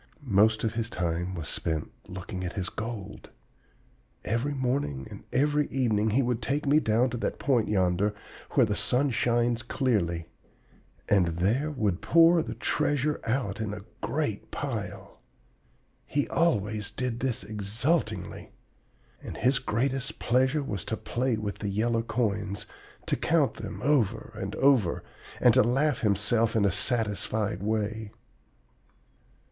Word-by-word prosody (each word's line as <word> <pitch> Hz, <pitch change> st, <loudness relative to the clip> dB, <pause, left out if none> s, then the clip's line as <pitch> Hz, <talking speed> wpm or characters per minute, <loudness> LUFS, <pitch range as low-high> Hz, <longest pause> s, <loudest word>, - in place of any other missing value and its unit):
Most 110 Hz, +2 st, +4 dB
of 110 Hz, -, 0 dB
his 115 Hz, -1 st, -2 dB
time 90 Hz, -1 st, -2 dB
was 80 Hz, -3 st, -5 dB
spent 80 Hz, -2 st, -2 dB, 0.2 s
looking 90 Hz, +1 st, -6 dB
at 90 Hz, -, -3 dB
his 95 Hz, -2 st, -3 dB
gold. 110 Hz, -3 st, -6 dB, 1.0 s
Every 125 Hz, +6 st, -1 dB
morning 125 Hz, -, -1 dB
and -, -, -9 dB
every 145 Hz, +2 st, +2 dB
evening 110 Hz, -5 st, +1 dB
he 130 Hz, +6 st, +2 dB
would 120 Hz, -1 st, -1 dB
take 140 Hz, +7 st, -1 dB
me 145 Hz, +2 st, +5 dB
down 120 Hz, -1 st, +2 dB
to 120 Hz, -, -3 dB
that -, -, -2 dB
point 125 Hz, -5 st, +2 dB
yonder 95 Hz, +1 st, +1 dB, 0.4 s
where 130 Hz, -, +5 dB
the 105 Hz, -1 st, -1 dB
sun 130 Hz, +6 st, +1 dB
shines 120 Hz, 0 st, +1 dB
clearly, 95 Hz, -, 0 dB, 0.8 s
and 95 Hz, -4 st, +4 dB
there 115 Hz, -, +1 dB
would 105 Hz, -, -1 dB
pour 165 Hz, +8 st, +6 dB
the -, -, -5 dB
treasure 145 Hz, +1 st, 0 dB
out 115 Hz, -4 st, -1 dB
in 105 Hz, -2 st, -2 dB
a 100 Hz, 0 st, -10 dB, 0.2 s
great -, -, -2 dB
pile. -, -, -5 dB, 0.9 s
He 145 Hz, 0 st, 0 dB
always 105 Hz, -, +1 dB
did 125 Hz, -2 st, -2 dB
this 125 Hz, -1 st, -1 dB
exultingly. 110 Hz, +10 st, -2 dB, 0.7 s
And -, -, -7 dB
his 130 Hz, +2 st, +3 dB
greatest 130 Hz, +3 st, -1 dB
pleasure 130 Hz, +5 st, +2 dB
was 100 Hz, -9 st, -4 dB
to 110 Hz, -, -2 dB
play 120 Hz, +1 st, -1 dB
with 105 Hz, -2 st, -4 dB
the 100 Hz, -, -2 dB
yellow 115 Hz, +3 st, +1 dB
coins, 105 Hz, -4 st, -2 dB, 0.4 s
to -, -, +1 dB
count -, -, +2 dB
them -, -, -6 dB
over 135 Hz, -7 st, +1 dB
and -, -, -5 dB
over, 130 Hz, -11 st, +3 dB, 0.4 s
and -, -, +6 dB
to -, -, +6 dB
laugh 135 Hz, +6 st, +2 dB
to 110 Hz, -, +1 dB
himself 110 Hz, +3 st, +2 dB
in 105 Hz, -2 st, +3 dB
a 100 Hz, -, +3 dB
satisfied 105 Hz, -1 st, +1 dB
way. 110 Hz, 0 st, -2 dB
115 Hz, 145 wpm, -28 LUFS, 100-130 Hz, 1.0 s, pour